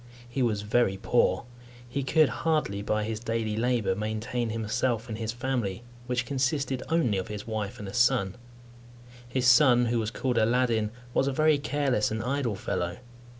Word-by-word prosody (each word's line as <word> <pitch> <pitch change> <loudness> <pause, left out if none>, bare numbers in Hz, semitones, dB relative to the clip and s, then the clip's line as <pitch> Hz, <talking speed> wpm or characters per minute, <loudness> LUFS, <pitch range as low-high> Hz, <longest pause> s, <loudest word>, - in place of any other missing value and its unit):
He 130 +2 -3
was 110 -4 +1
very 105 -2 +2
poor. 120 +1 +2 0.4
He 140 +3 -2
could 155 +3 +4
hardly, 130 -5 -1
by 105 +1 0
his 110 0 -3
daily 115 -2 -2
labour, 115 -4 +1
maintain 110 +4 -2
himself 115 +1 -1
and 110 - -4
his 110 -1 -2
family, 120 -4 -2 0.2
which 125 0 0
consisted 135 0 -1
only 145 - +2
of 95 - -5
his 105 -1 -6
wife 110 -3 -4
and 105 - -7
a 95 - -7
son. 120 -5 +2 0.9
His 125 +1 -1
son, 130 -2 +6
who 120 0 +1
was 110 -1 -1
called 125 +1 -1
Aladdin, 115 -1 +2 0.2
was 135 - +2
a - - +1
very 155 +1 +3
careless 140 -5 0
and 110 0 -3
idle 125 -3 -1
fellow. 90 -1 -3
120 Hz, 170 wpm, -28 LUFS, 110-130 Hz, 0.9 s, son